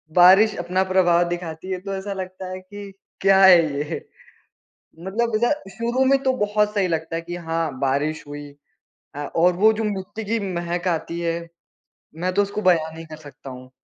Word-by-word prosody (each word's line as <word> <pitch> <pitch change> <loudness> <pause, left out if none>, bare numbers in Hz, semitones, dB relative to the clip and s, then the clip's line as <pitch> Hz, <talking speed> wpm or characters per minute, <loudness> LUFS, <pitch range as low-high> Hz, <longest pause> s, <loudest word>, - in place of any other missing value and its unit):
बारिश 190 +4 +7
अपना 180 +2 0
प्रभाव 175 -2 +4
दिखाती 175 +1 -5
है, 185 - -2
तो 195 +1 -5
ऐसा 195 +1 -4
लगता 185 -1 -7
है 185 - -5
कि 200 +1 -10 0.3
क्या 195 0 +5
है 185 -2 +9 0.2
ये? 145 +1 -4 0.9
मतलब 215 +5 -1
ज 240 - +3 0.2
शुरू 240 +4 0
में 270 +1 +4
तो 265 -1 +2
बहुत 210 0 +1
सही 195 -3 +1
लगता 165 0 -2
है 165 - -3
कि 175 +1 -6
हाँ, 165 -4 -3
बारिश 145 +3 -1
हुई। 145 0 -8 0.7
अ, - - -6 0.2
और 175 +2 +4
वो 215 +4 +5
जो 220 +1 -3
मिट्टी 205 +1 -4
की 225 +3 0
महक 175 +1 -3
आती 170 0 -2
है, 170 0 -1 0.8
मैं 180 +3 -2
तो 205 - +4
उसको 205 +1 -4
बयान 165 -4 +2
नहीं 165 0 -9
कर 155 -1 -9
सकता 145 -2 -12
हूँ। 130 0 -11
180 Hz, 185 wpm, -22 LUFS, 165-200 Hz, 0.9 s, है